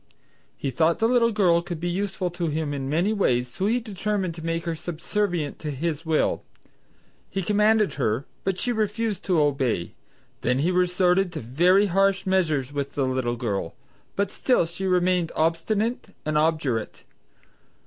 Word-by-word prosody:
He 135 - -3
thought 165 +3 +2
the 225 - +2
little 235 -1 +3
girl 180 -6 +3
could 170 -1 -6
be 175 - -2
useful 185 0 -2
to 175 -1 -2
him 155 -1 -2
in 135 -1 -3
many 175 +8 +1
ways 125 - +1
so 185 +11 -2
he 235 +3 +2
determined 205 -4 -2
to 165 -1 -9
make 165 +1 -2
her 170 - -1
subservient 170 0 -2
to 155 - -4
his 160 +3 -3
will. 160 -1 +1 0.9
He 195 0 -2
commanded 210 +1 +3
her, 125 -1 -1 0.2
but 190 -1 -1
she 245 - 0
refused 220 -1 -1
to 180 -4 +2
obey, 135 - 0 0.5
then 125 +1 +1
he 160 +7 +1
resorted 180 +1 +2
to 155 - -4
very 175 - +3
harsh 195 +1 +2
measures 155 -8 +1
with 140 -1 -3
the 140 - 0
little 130 -2 -1
girl, 100 -8 -3 0.4
but 200 0 0
she - - -17
still 250 -9 +3 0.2
remained 180 -2 +2
obstinate 200 +10 0 0.2
and 155 0 -1
obdurate. 150 -8 0
170 Hz, 165 wpm, -25 LUFS, 145-195 Hz, 0.9 s, little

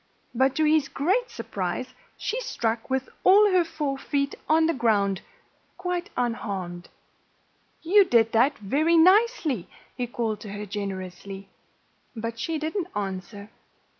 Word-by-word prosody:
But 265 +2 +2
to 315 - +2
his 305 -2 +3
great 395 - 0
surprise - - -4 0.2
she - - -2
struck 230 - -2
with 265 0 -1 0.2
all 410 +2 +6
her 365 -1 +4
four 300 -4 -3
feet 280 0 -1 0.2
on 320 +1 +5
the 330 - +2
ground, 205 - +1 0.6
quite 360 +1 -3
unharmed. 195 -7 -3 0.9
"You 390 +4 +6
did 230 -7 +3
that 250 +6 +3
very 300 +11 +2
nicely," 365 - +3 0.3
he 245 - -2
called 225 -3 -2
to 205 -1 -8
her 205 +1 -5
generously. 195 -1 -6 0.7
But 230 0 -5
she 325 +6 -2
didn't 320 +4 -2
answer. 200 +1 -5
255 Hz, 135 wpm, -26 LUFS, 205-330 Hz, 0.9 s, all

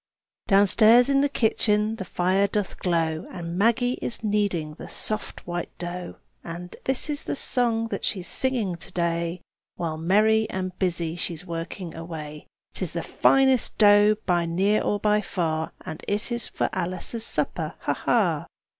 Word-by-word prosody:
hi!" 195 - +5
Downstairs 220 +5 +6
in 275 0 +4
the 285 - +2
kitchen 215 -3 +1
the 190 - -5
fire 185 +3 +1
doth 205 0 -3
glow, 165 -3 0
And 170 -1 -6
Maggie 235 +5 +2
is 235 - -3
kneading 200 -7 0
the - - -10
soft 215 0 -4
white 175 -1 -3
dough, 175 0 -6 0.3
And 175 +1 -7
this 265 -1 0
is 295 -1 -2
the - - -2
song 235 -4 0
that - - -4
she's 185 -5 -1
singing 245 -8 +1
to 190 - -9
day, 170 0 -1 0.3
While 160 -2 -3
merry 215 +5 +3
and 185 -1 -4
busy 170 -3 -1
she's 175 -1 -4
working 170 0 -5
away: 155 -2 -8 0.3
"'Tis - - -3
the - - -3
finest 265 -2 +3
dough, 205 0 +6
by 175 -2 +1
near 195 +5 +2
or 205 - 0
by 210 +1 +2
far, 160 -5 -2
And 155 - -7
it 210 +4 -1
is 235 -1 -2
for - - -1
Alice's 185 +6 -3
supper, - - -2
ha! - - 0
ha!" - - +1
190 Hz, 165 wpm, -25 LUFS, 170-220 Hz, 0.3 s, Downstairs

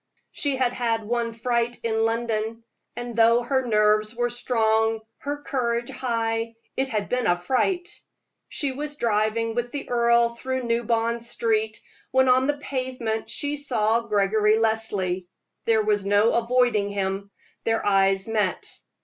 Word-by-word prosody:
She 285 -2 0
had 255 -2 +1
had 230 -2 -1
one 235 +1 -1
fright 235 +1 -1
in 225 -1 +1
London; 225 0 -2 0.3
and 240 -1 -6
though 230 +1 +5
her 260 +1 0
nerves 215 0 +2
were 240 0 0
strong, 225 -2 +1 0.2
her 290 +1 -5
courage 235 -2 -1
high, 230 -2 -2 0.2
it 265 0 0
had 210 -3 -2
been 250 -2 0
a 175 - +4
fright. 310 - 0 0.6
She 285 -4 -1
was 295 +2 -4
driving 225 -1 0
with 240 +1 -2
the 285 +1 -5
earl 235 0 +4
through 260 +2 -4
New 235 0 0
Bond 230 +1 0
Street, 220 -2 -1 0.3
when 260 0 +3
on 260 +1 +4
the 290 0 0
pavement 255 -5 -3
she 290 0 -1
saw 230 -6 +1
Gregory 210 0 +2
Leslie. 205 -5 -1 0.4
There 220 -1 +3
was 210 -1 +1
no 205 +3 +3
avoiding 235 -3 +2
him 195 0 -2 0.3
their 225 0 0
eyes 195 0 +3
met. 210 -5 0
230 Hz, 150 wpm, -24 LUFS, 215-245 Hz, 0.6 s, though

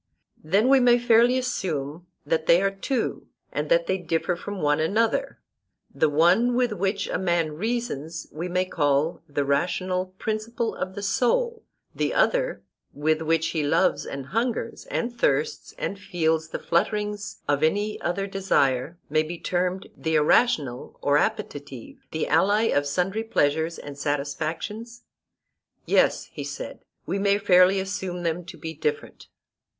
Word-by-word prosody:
Then 195 +9 +2
we 270 0 +6
may 245 -1 +5
fairly 240 +1 +4
assume 170 - -3 0.2
that 160 0 0
they 170 - +6
are 195 - +2
two, 230 +6 -3 0.2
and - - -3
that - - +4
they 190 - 0
differ 170 +1 -1
from 200 +3 -6
one 150 -1 +2
another; 225 - +1 0.6
the 155 - +2
one 180 +11 +4
with 245 -2 +2
which 195 +1 -1
a - - -2
man 170 -4 +1
reasons, 170 - -3
we 165 +4 -4
may 180 +1 +1
call 145 -2 +1
the 145 0 -1
rational 180 +6 0
principle 220 +2 -2
of 190 0 -5
the 205 - -5
soul, 455 - +1 0.3
the - - -1
other, - - +1 0.3
with 155 +2 0
which 160 0 +1
he 160 - -1
loves 145 - +2
and 140 -1 -6
hungers 230 - -2
and 240 0 -2
thirsts 145 -9 0
and 195 - -3
feels 160 -5 0
the - - -4
flutterings 210 +4 -1
of 145 0 +1
any 205 +7 0
other 175 +3 -1
desire, 170 -7 +1
may 155 +1 +2
be 165 +2 -5
termed 180 +2 -1
the 160 0 -1
irrational 150 - +2
or 145 +1 +4
appetitive, 140 -6 -4
the 160 - -2
ally 200 +8 +3
of 145 -10 +1
sundry 185 +9 -1
pleasures 160 -5 +1
and 145 -1 -9
satisfactions? 160 +12 -3 0.8
Yes, - - +3
he - - -5
said, - - -6 0.3
we 200 - -2
may 200 0 +3
fairly 190 -1 +5
assume 190 -2 -4
them 170 +1 -1
to 175 -1 -10
be 160 +1 -6
different. 450 - -4
180 Hz, 150 wpm, -25 LUFS, 155-215 Hz, 0.8 s, we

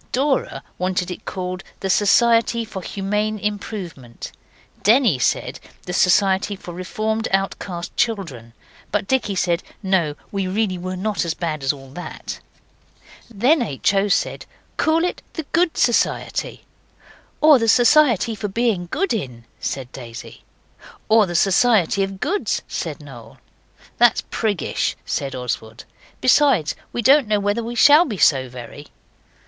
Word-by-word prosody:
Dora 270 +2 0 0.2
wanted 185 0 -1
it 180 - -8
called 185 0 -5 0.2
the 195 - -2
Society 230 +3 +3
for 200 -3 -7
Humane 210 +3 -2
Improvement; 190 - -6 0.5
Denny 220 - +4
said - - -1 0.3
the 180 - -5
Society 195 +2 +3
for 180 -2 -10
Reformed 215 +5 -2
Outcast 195 -2 -3
Children; 165 - -2 0.4
but 210 -1 -1
Dicky 255 -7 0
said, 175 -1 0 0.2
No, 180 -6 +1 0.2
we 195 -2 -2
really 190 -1 -1
were 185 +1 -4
not 205 +3 -3
so 170 - 0
bad 155 -4 -3
as 135 - +2
all 135 -2 -12
that. 175 +6 -7 0.9
Then 245 +8 +2
H. 170 - 0
O. 195 +1 +2
said, 200 - -1 0.3
'Call 325 +2 +2
it 360 - -3
the 320 - -5
Good 345 -1 +2
Society.' 240 - 0 0.7
'Or 300 -3 +6
the 230 - 0
Society 245 -2 +4
for 210 -1 -4
Being 205 -4 -1
Good 390 - -1
In,' 125 - -5
said 130 -2 -4
Daisy. 115 -3 -10 0.7
'Or 220 -2 +5
the 175 - -5
Society 195 +1 +3
of 195 0 -3
Goods,' 390 - -1
said - - -5
Noel. - - -12 0.6
'That's 240 -1 +4
priggish,' 205 - -1
said 135 -1 -3
Oswald; 115 -2 -5 0.4
'besides, 255 - +3 0.2
we 235 - -3
don't 275 +1 +5
know 210 -1 +2
whether 205 +3 -1
we 235 +1 -5
shall 295 +8 +7
be 225 - -5
so 130 -6 +3
very. 125 +4 -10
200 Hz, 140 wpm, -21 LUFS, 175-230 Hz, 0.9 s, shall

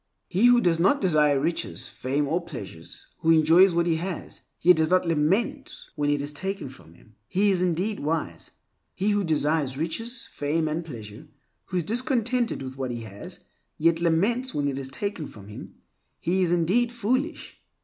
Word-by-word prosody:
He 205 +7 +3
who 245 0 +6
does 170 -4 +2
not 195 +11 +4
desire 150 -6 +3
riches, 165 +4 -2
fame, 140 +3 -2
or 165 +5 0
pleasures; 100 - -9
who 165 - 0
enjoys 165 +3 +6
what 170 0 +2
he 165 -2 +1
has, 180 +1 -5 0.2
yet 180 0 +5
does 160 0 +2
not 185 -1 +3
lament 165 +8 0 0.2
when 145 -1 -1
it 145 -1 +1
is 145 +1 -4
taken 190 -1 -3
from 85 -10 -15
him, 110 - -22
he 200 +2 +2
is 185 -2 +1
indeed 185 +4 0
wise. 150 - -3 0.5
He 200 +3 +1
who 205 -1 +1
desires 150 -4 0
riches, 225 - -3
fame, 155 +2 -1
and 155 +2 -2
pleasure; 110 -8 -10 0.4
who 185 - -3
is 175 - 0
discontented 240 - 0
with 130 0 -8
what 130 -1 -2
he 120 -1 -4
has, 100 -2 -9 0.4
yet 165 +1 +2
laments 205 +10 +1
when 145 -1 0
it 135 -1 -2
is 135 -1 -4
taken 180 +1 -3
from 100 -1 -13
him, 105 - -10 0.4
he 185 +3 0
is 175 -2 +2
indeed 190 +8 +2
foolish. 255 +7 -2
165 Hz, 180 wpm, -26 LUFS, 145-195 Hz, 0.5 s, who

